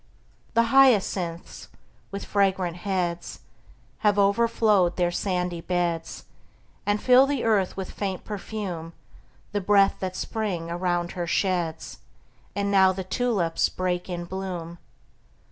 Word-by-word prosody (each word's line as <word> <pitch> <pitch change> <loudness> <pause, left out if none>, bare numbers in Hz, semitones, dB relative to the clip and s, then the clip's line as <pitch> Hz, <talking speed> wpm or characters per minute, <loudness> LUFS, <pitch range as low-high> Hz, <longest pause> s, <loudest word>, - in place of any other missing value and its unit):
The 230 - +5
hyacinths, 195 -10 +2 0.4
with 200 0 -6
fragrant 190 -3 +1
heads, 175 -2 -3 0.6
Have 210 -2 +2
overflowed 205 -2 +3
their 175 -1 +1
sandy 180 -2 -2
beds, 170 -2 -2 0.6
And 205 0 +2
fill 255 +3 +6
the 280 -3 -1
earth 205 -5 +1
with 190 -1 -5
faint 195 -3 -4
perfume, 195 -6 -5 0.6
The 205 0 -1
breath 200 0 +4
that 185 -1 -4
Spring 185 -8 -3
around 175 0 -1
her 175 -2 -4
sheds. 175 -3 -1 0.6
And 200 0 -1
now 190 -1 +5
the 190 0 -4
tulips 190 -5 0
break 180 0 -2
in 175 -1 -4
bloom! 175 -2 -6
190 Hz, 120 wpm, -25 LUFS, 175-205 Hz, 0.6 s, fill